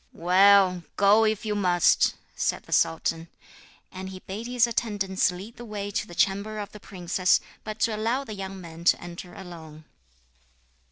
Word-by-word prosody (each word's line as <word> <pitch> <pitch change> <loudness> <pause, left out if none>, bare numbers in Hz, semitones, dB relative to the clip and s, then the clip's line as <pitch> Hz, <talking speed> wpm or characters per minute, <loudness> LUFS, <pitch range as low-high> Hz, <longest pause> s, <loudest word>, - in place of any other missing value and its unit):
'Well, 185 +1 +5 0.2
go 205 +2 +5
if 215 0 -1
you 210 - -1
must,' 180 -4 +3 0.2
said - - -1
the - - -17
sultan. 165 0 +1 0.6
And 190 0 -7
he 185 -1 -9
bade 215 +5 -6
his 245 -1 +3
attendants 205 -6 0
lead 195 +6 -10
the 240 - -9
way 205 -3 -5
to - - -2
the 175 - -11
chamber 200 +4 0
of 205 -1 -5
the 210 - -11
princess, 185 -1 +1 0.2
but 215 -1 -6
to 225 - +2
allow 230 +6 -1
the 220 - -8
young 195 -1 -6
man 170 -1 -10
to - - +5
enter 175 +1 -9
alone. 160 -4 -11
195 Hz, 170 wpm, -26 LUFS, 180-215 Hz, 0.6 s, Well